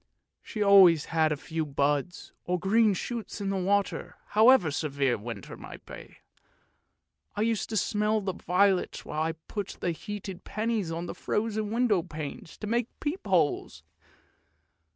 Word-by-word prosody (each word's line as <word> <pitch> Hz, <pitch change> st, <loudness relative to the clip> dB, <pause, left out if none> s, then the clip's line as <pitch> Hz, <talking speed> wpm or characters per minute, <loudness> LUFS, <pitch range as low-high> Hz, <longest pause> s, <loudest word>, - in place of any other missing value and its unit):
She 210 Hz, -, -3 dB
always 190 Hz, -6 st, +7 dB
had 160 Hz, -1 st, +3 dB
a 150 Hz, -, 0 dB
few 160 Hz, +2 st, -3 dB
buds, 145 Hz, +3 st, -1 dB
or 180 Hz, +1 st, 0 dB
green 210 Hz, +2 st, +3 dB
shoots 230 Hz, +2 st, -5 dB
in 195 Hz, -2 st, -1 dB
water, 200 Hz, 0 st, 0 dB
however 220 Hz, -, +5 dB
severe 140 Hz, -2 st, 0 dB
the 105 Hz, -, -9 dB
winter 110 Hz, -4 st, -7 dB
might -, -, -11 dB
be. -, -, -11 dB, 1.2 s
I -, -, -1 dB
used 225 Hz, -2 st, 0 dB
to 220 Hz, -, -1 dB
smell 210 Hz, +2 st, +1 dB
the 190 Hz, -2 st, -3 dB
violets 185 Hz, +2 st, +1 dB
while 155 Hz, -, -3 dB
I 160 Hz, +1 st, 0 dB
put 185 Hz, +5 st, -6 dB
the 175 Hz, -, 0 dB
heated 195 Hz, +1 st, -7 dB
pennies 215 Hz, -5 st, -2 dB
on 165 Hz, +1 st, -3 dB
the -, -, -5 dB
frozen 215 Hz, -1 st, -2 dB
window 225 Hz, -4 st, +2 dB
panes 155 Hz, 0 st, -7 dB
to -, -, -6 dB
make 235 Hz, +2 st, 0 dB
peep 300 Hz, -, -3 dB
holes. 170 Hz, -6 st, +1 dB
195 Hz, 150 wpm, -28 LUFS, 160-215 Hz, 1.2 s, always